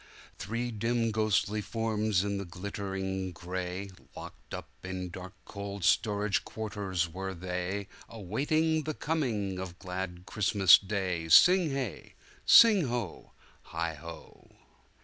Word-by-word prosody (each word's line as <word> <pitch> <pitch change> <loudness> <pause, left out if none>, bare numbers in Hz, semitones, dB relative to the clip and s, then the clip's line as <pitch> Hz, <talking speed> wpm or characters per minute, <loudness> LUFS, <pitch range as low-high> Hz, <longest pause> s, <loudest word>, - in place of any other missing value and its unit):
Three 115 +5 -3
dim 115 +1 0
ghostly 110 -1 +1
forms 110 -3 0
in 100 -1 -2
the 100 - -5
glimmering 95 +1 -4
grayLocked 90 +2 -7
up - - -6 0.2
in 90 -1 -5
dark 95 +2 -9
cold 100 -1 -6
storage 105 +1 +2
quarters 100 -5 -3
were 95 +3 -5
theyAwaiting 100 - -2
the 155 -1 -3
coming 110 - -1
of 90 -2 -6
glad 90 -1 -5
Christmas 95 -3 +5
day 95 -5 -2
Sing 180 - +7
hey! 135 -6 -4 0.3
sing 210 -8 +8
ho! 120 -7 -4 0.3
heigho! 80 0 -7
100 Hz, 110 wpm, -30 LUFS, 90-110 Hz, 0.3 s, sing